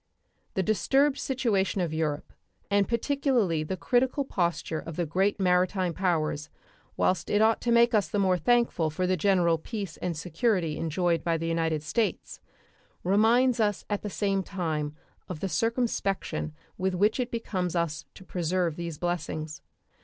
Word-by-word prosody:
The 190 - +1
disturbed 270 +7 +2
situation 225 -8 0
of 170 -3 -1
Europe, 155 -2 -2 0.4
and 200 -1 +3
particularly 235 - +1
the 170 +5 -3
critical 260 +5 +1
posture 170 -6 -1
of 165 - -8
the 175 - -1
great 190 +6 +1
maritime 180 -1 +2
powers, 155 -5 -1 0.5
whilst 185 - +1
it 205 - +2
ought 220 +1 +3
to 240 - 0
make 235 0 +5
us 210 -2 +3
the - - -2
more 185 -2 +2
thankful 235 -5 +2
for 170 +4 -2
the 185 +1 +2
general 175 -2 +2
peace 200 -2 -6
and 175 -3 -3
security 175 0 0
enjoyed 165 0 0
by 165 -1 +1
the 165 +1 -3
United 165 -2 0
States, 215 +9 -2 0.6
reminds 230 +6 +4
us 205 -2 0
at 205 - 0
the 210 - -4
same 195 -1 0
time 160 -6 -3 0.3
of 180 -4 -5
the 195 - -2
circumspection 195 -4 -1 0.2
with 190 0 0
which 210 +6 +2
it 250 -1 -1
becomes 185 -7 -2
us 170 -3 -1
to - - -12
preserve 175 -2 -1
these 170 -3 -5
blessings. 155 -3 -3
185 Hz, 160 wpm, -28 LUFS, 165-215 Hz, 0.6 s, make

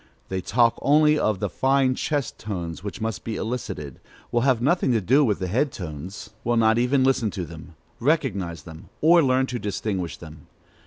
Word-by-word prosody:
They 95 0 -2
talk 115 +5 +2
only 150 +1 +4
of 110 -6 +1
the 105 - -1
fine 135 +6 +2
chest 145 +1 -2
tones 90 -5 -5
which 100 +1 -6
must 110 -2 -3
be 115 - -4
elicited, 95 - -5 0.3
will 120 - +2
have 130 -2 +3
nothing 140 +2 +2
to 115 - +3
do 130 +9 +3
with 105 -7 +1
the 95 - -3
head 125 +10 0
tones, 85 +2 -7
will 120 0 +1
not 110 0 +4
even 130 +2 +2
listen 130 -4 +2
to 95 -3 -4
them, 80 +1 -12 0.2
recognize 95 - 0
them, 80 -1 -12
or 170 +2 +6
learn 130 -2 +2
to 125 -2 -4
distinguish 95 -5 -3
them. 80 -3 -12
110 Hz, 190 wpm, -24 LUFS, 90-130 Hz, 0.3 s, or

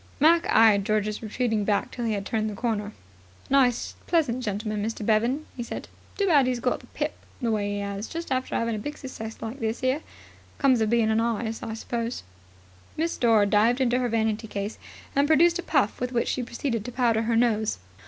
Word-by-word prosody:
Mac 330 +3 +5
eyed 215 -3 +6
George's 215 +1 0
retreating 225 -1 -1
back 200 0 0
till 240 - -4
he 225 - +1
had 200 -1 -3
turned 215 0 -1
the 210 - -6
corner. 210 -2 -2 0.5
"A - - -4
nice 255 -4 +3
pleasant 290 -8 +1
gentleman, 210 0 -2
Mr. 220 -1 -3
Bevan," 235 +8 +2
he 245 - -5
said. 235 - -6 0.3
"Too 400 - +2
bad 290 -8 +5
'e's 250 -1 0
got 250 +1 0
the - - -17
pip - - -3 0.3
the 235 -4 0
way 205 -1 -1
'e - - -3
'as, 200 +1 -4
just 335 -2 -6
after 260 0 -1
'avin' 230 0 0
a 215 - -2
big 295 +8 -5
success 225 -5 -7
like 225 +5 -5
this 225 +1 -2
'ere. 260 +4 +1 0.6
Comes 260 -5 +3
of 220 - +2
bein' 230 -1 +3
a 220 +1 +2
artist, 225 -1 -2
I 220 - -4
suppose." 230 +1 -4 0.7
Miss 330 +2 0
Dore 225 -4 +4
dived 220 +5 +3
into 250 -1 +2
her 245 -1 0
vanity 220 0 0
case 205 0 -4 0.4
and 280 +1 +3
produced 335 +3 +4
a - - 0
puff 275 - +1
with 250 0 -1
which 235 - +1
she 255 - -1
proceeded 235 -1 -3
to 245 - -5
powder 235 -3 +2
her 230 0 0
nose. 220 - +2
230 Hz, 210 wpm, -26 LUFS, 215-255 Hz, 0.7 s, eyed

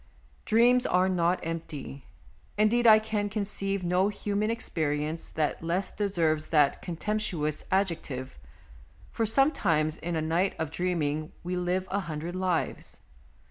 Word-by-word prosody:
Dreams 245 +3 +4
are 180 +1 +3
not 180 -1 +1
empty; 155 -5 -6 0.5
indeed, 230 +3 +3
I 215 -1 +9
can 215 -1 -2
conceive 200 -2 -2
no 180 +2 +2
human 210 +1 -1
experience 155 -7 -2
that 155 -2 -2
less 180 +3 -1
deserves 165 -7 0
that 150 -3 +3
contemp 195 +5 -2
tuous 155 -7 -2
adjective, 160 - -1 0.7
for 225 - 0
sometimes 185 - +2
in 175 0 -4
a - - +1
night 170 +5 +1
of 160 -2 -3
dreaming 155 -3 -1
we 180 +1 -3
live 180 +1 -1
a 200 - +1
hundred 170 -1 -5
lives. 185 -2 -2
180 Hz, 135 wpm, -28 LUFS, 160-205 Hz, 0.7 s, I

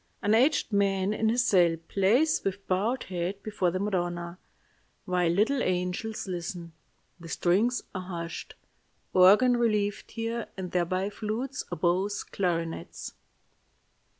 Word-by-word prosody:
An 210 - +3
aged 255 0 +3
man 195 0 +2
in 220 +1 +1
his 245 +2 +2
cell 175 -7 +4
plays 235 +12 +2
with 195 0 -3
bowed 215 +7 0
head 185 +2 -4
before 205 -4 0
the 180 - -2
Madonna, 175 -3 -2 0.7
while 180 -3 +1
little 220 +10 +2
angels 180 +5 -2
listen. 175 -2 -5 0.5
The 165 -1 -10
strings 210 +11 +1
are 185 - -3
hushed. 170 -2 -6 0.6
Organ 210 +7 +6
relieved 210 -3 0
here 230 0 -3
and 185 -2 -5
there 175 -1 +1
by 185 +3 -1
flutes, 230 +6 -3
oboes, 180 +4 0
clarinets. 165 - -3
195 Hz, 125 wpm, -28 LUFS, 180-220 Hz, 0.7 s, Organ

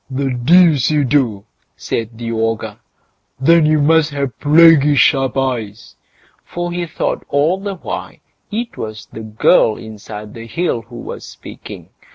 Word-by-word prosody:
"The 135 0 -2
deuce 150 +1 +4
you 150 -2 +2
do!" 120 -7 0 0.3
said 115 0 -4
the 115 0 -5
ogre; 110 -1 -2 0.6
"then 165 +3 +4
you 155 0 +3
must 160 +1 +3
have 140 -3 -4
plaguey 150 -1 +5
sharp 135 -1 +2
eyes"; 120 -5 -3 0.5
for 175 0 -5
he 175 0 -3
thought - - -3
all 155 +7 +1
the 200 0 -5
while 180 - -6 0.4
it 230 +3 -4
was 110 0 -7
the - - -9
girl 110 0 +2
inside 105 -1 -10
the 115 0 -9
hill 165 -3 -2
who 115 +2 -15
was 120 - -8
speaking. - - -11
135 Hz, 150 wpm, -17 LUFS, 115-160 Hz, 0.6 s, plaguey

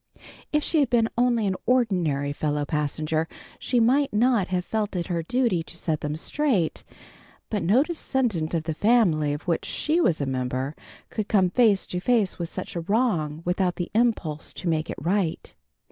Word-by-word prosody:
If 300 0 +1
she 320 - +1
had 280 -4 +2
been 230 -2 +3
only 240 -2 +2
an 190 -1 0
ordinary 180 - +1
fellow 145 0 -1
passenger 155 +2 -1 0.3
she 245 - +1
might 270 +5 +3
not 225 -2 +2
have 180 -1 -1
felt 215 -2 -2
it 175 -1 -1
her 170 - 0
duty 235 -1 +1
to 170 +1 -8
set 160 -3 -2
them 150 0 -2
straight. 210 - 0 0.7
But 210 -3 0
no 210 +11 +4
descendant 245 - -1
of 160 - -1
the 160 0 -2
family 175 -7 +3
of 145 +1 -4
which 170 -2 0
she 320 +3 0
was 170 - +2
a 140 - -1
member, 130 +2 -2 0.4
could 215 -2 -3
come 190 -4 +3
face 215 -4 +3
to 180 - -4
face 215 -2 +1
with 170 -1 -3
such 185 - -6
a 170 - -2
wrong, 165 -7 0
without 180 0 0
the 175 - -4
impulse 210 -10 0
to 180 - -6
make 160 -1 0
it - - -5
right. 175 +2 -1
180 Hz, 185 wpm, -25 LUFS, 155-235 Hz, 0.7 s, no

